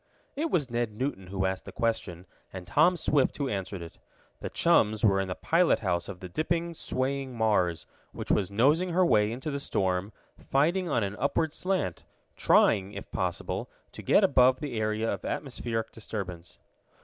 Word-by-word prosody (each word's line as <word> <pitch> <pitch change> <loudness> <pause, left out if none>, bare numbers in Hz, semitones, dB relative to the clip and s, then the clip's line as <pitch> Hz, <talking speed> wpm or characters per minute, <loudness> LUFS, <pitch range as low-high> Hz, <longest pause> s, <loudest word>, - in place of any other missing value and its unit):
It 315 +4 -1
was 155 - +1
Ned 120 -2 -1
Newton 105 -5 -4
who 95 0 -2
asked 95 0 -2
the - - -8
question, 100 -6 -2 0.3
and 95 -1 -8
Tom 170 - +3
Swift 145 -3 +1
who 140 - -1
answered 95 -5 -4
it. 85 - -12 0.4
The - - -5
chums 110 +1 +3
were 95 -2 +4
in 95 - -1
the 90 - -3
pilot 170 +1 +2
house 85 -3 -1
of 90 -2 -8
the 95 - -6
dipping, 170 - -1
swaying 135 -3 -3
Mars, 100 -7 +1 0.3
which - - -4
was 95 -3 +1
nosing 150 - +2
her 185 +1 +4
way 105 -9 +3
into 130 +6 -4
the 140 - -3
storm, 95 -5 -1 0.4
fighting 170 +6 +2
on 120 -6 +1
an 100 0 -3
upward 150 +2 0
slant, 180 - -2 0.3
trying, 95 +1 +3
if - - -9
possible, - - -3 0.2
to - - -9
get - - +4
above 130 -1 +5
the 140 -7 -4
area 110 +1 -1
of - - -3
atmospheric 120 -5 -3
disturbance. 95 -6 -7
115 Hz, 175 wpm, -28 LUFS, 95-145 Hz, 0.4 s, above